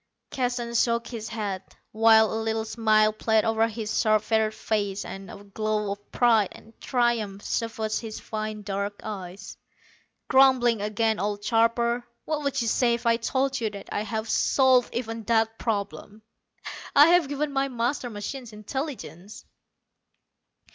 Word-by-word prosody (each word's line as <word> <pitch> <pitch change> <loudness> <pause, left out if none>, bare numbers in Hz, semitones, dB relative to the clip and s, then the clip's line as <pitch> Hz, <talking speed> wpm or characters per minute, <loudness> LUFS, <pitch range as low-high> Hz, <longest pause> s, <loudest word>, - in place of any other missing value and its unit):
Keston 245 -2 -2
shook 235 0 +2
his 225 -3 -6
head, 205 -4 -3 0.3
while 220 0 +5
a 220 - -1
little 220 0 -1
smile 215 -1 +3
played 220 0 +1
over 225 0 +2
his 220 -1 -2
sharp 215 -1 +3
featured 220 -1 +1
face, 205 -3 -2
and 195 +1 -8
a 200 - -10
glow 210 0 -2
of 205 0 -8
pride 225 -5 +3
and 225 - -16
triumph 230 -6 0
suffused 220 -1 -2
his 220 -2 -7
fine 215 -1 -5
dark 200 0 -3
eyes. 195 -2 -7 0.7
"Grumbling 255 -4 +4
again, 215 +1 0
old 205 +1 -3
carper. 235 +1 +2 0.2
What 310 -1 -2
would 280 -2 -1
you - - -2
say 235 +1 +2
if 235 - -9
I 230 0 +4
told 265 +2 -1
you 220 - 0
that 200 -1 -10
I - - -1
have 220 +1 -3
solved 255 +1 +3
even 225 -1 -3
that 225 0 +1
problem? 210 0 -4 0.7
I 290 +3 +8
have 345 -5 +4
given 290 +1 -2
my 270 0 +1
master 245 0 -2
machine 240 +4 -6
intelligence!" 215 - -7
225 Hz, 150 wpm, -26 LUFS, 210-240 Hz, 0.7 s, I